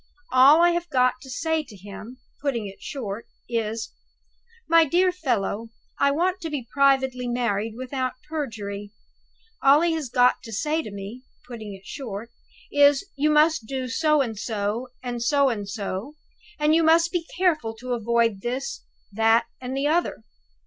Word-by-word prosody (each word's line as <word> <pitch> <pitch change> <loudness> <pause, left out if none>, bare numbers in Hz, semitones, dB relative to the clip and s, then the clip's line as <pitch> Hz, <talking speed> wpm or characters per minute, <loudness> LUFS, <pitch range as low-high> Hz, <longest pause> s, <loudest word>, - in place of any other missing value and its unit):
All 275 +6 +7
I 345 - +6
have 345 0 -2
got 255 -2 +2
to 265 - -12
say 320 +4 -1
to 250 -7 -14
him 205 +6 -10 0.2
(putting 260 -7 -1
it 195 -1 -10
short) 230 -6 -5 0.2
is, 225 -1 -3 0.7
'My 330 0 +6
dear 355 +5 +3
fellow, 230 - -2 0.3
I 280 - +4
want 360 +6 0
to 325 - -4
be 280 -6 -4
privately 265 -2 +2
married 225 -3 -1
without 255 0 -3
perjury.' 210 -9 -5 0.7
All 280 +3 +6
he 340 -1 +2
has 310 -6 -3
got 250 0 +3
to 225 - -10
say 300 +9 0
to 295 - -8
me 200 +6 -8 0.2
(putting 220 -5 -7
it 190 - -16
short) 230 -4 -6 0.4
is, 285 +1 +5
'You 290 +2 +2
must 300 -5 +3
do 260 0 -3
so 305 +3 +2
and 225 -6 -3
so 220 +2 -2 0.2
and 240 -1 -4
so 280 +3 +3
and 205 -4 -4
so, 205 +6 -4 0.4
and 300 +1 +3
you 330 - +5
must 330 +1 +4
be 345 -2 -2
careful 315 -12 +1
to 250 +2 -4
avoid 230 -3 +1
this, 260 - -4 0.3
that, 225 +2 +3 0.2
and 260 +1 -4
the 275 - 0
other. 330 +4 0
255 Hz, 165 wpm, -24 LUFS, 225-300 Hz, 0.7 s, All